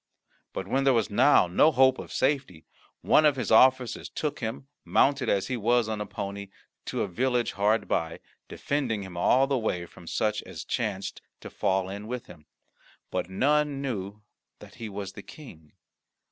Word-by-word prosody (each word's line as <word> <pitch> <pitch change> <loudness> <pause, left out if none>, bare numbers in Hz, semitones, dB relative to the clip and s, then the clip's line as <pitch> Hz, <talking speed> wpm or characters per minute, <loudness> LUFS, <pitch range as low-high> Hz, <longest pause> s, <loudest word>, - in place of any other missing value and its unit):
But 95 - -5
when 135 +6 +1
there 135 -2 +4
was 115 -3 0
now 125 +1 +5
no 90 - +4
hope 130 -1 +4
of - - -8
safety, 130 - -1 0.4
one 155 - +4
of 150 -2 +4
his 125 -5 -3
officers 130 +2 +4
took 150 -1 -3
him, 115 +3 -5 0.2
mounted 135 -3 +2
as 100 -1 +1
he 130 - -2
was 120 0 +2
on 110 -1 -3
a 105 - -4
pony, 100 -1 -6 0.4
to - - -2
a - - -2
village 120 +5 0
hard 105 +3 +1
by, 80 0 -1 0.3
defending 125 -8 -2
him 95 -2 -9
all 125 +9 +3
the 135 -2 0
way 90 -6 -2
from 85 0 -16
such 105 +3 -1
as - - -9
chanced 105 -5 -3 0.2
to - - -9
fall 95 -2 0
in 100 +2 -7
with 125 0 -5
him 75 0 -15 0.6
but - - -2
none 145 +7 +1
knew 105 -6 -5 0.3
that - - -14
he 110 - -4
was 100 -1 -6
the - - -9
King. 80 - -13
110 Hz, 180 wpm, -27 LUFS, 100-130 Hz, 0.6 s, now